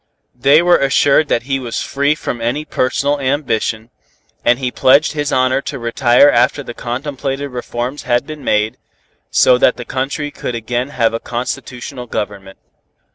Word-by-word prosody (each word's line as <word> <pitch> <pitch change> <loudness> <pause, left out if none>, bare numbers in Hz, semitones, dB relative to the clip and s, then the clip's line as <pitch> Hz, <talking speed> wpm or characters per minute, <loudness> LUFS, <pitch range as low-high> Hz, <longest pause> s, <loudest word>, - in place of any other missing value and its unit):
They 140 +6 +4
were 175 0 +4
assured 140 +2 +3
that 120 - 0
he 135 +1 -1
was 120 -3 -4
free 140 +2 0
from 120 -5 -5
any 125 +7 -1
personal 140 +1 0
ambition, 125 -5 -1 0.5
and 120 0 +3
he 125 -2 -2
pledged 140 +6 +4
his 145 -1 -2
honor 130 +1 +2
to 140 - -5
retire 120 +2 +4
after 125 +2 +2
the 120 - -7
contemplated 135 +3 -4
reforms 125 +2 -4
had 120 -1 0
been 155 -2 -9
made, 105 +1 0 0.5
so 125 -1 +4
that 125 - +3
the 120 - -7
country 140 +4 -3
could 125 - -5
again 120 +3 -2
have 115 -5 +1
a 115 - -2
constitutional 125 +1 -5
government. 100 -3 -5
130 Hz, 160 wpm, -17 LUFS, 120-140 Hz, 0.5 s, They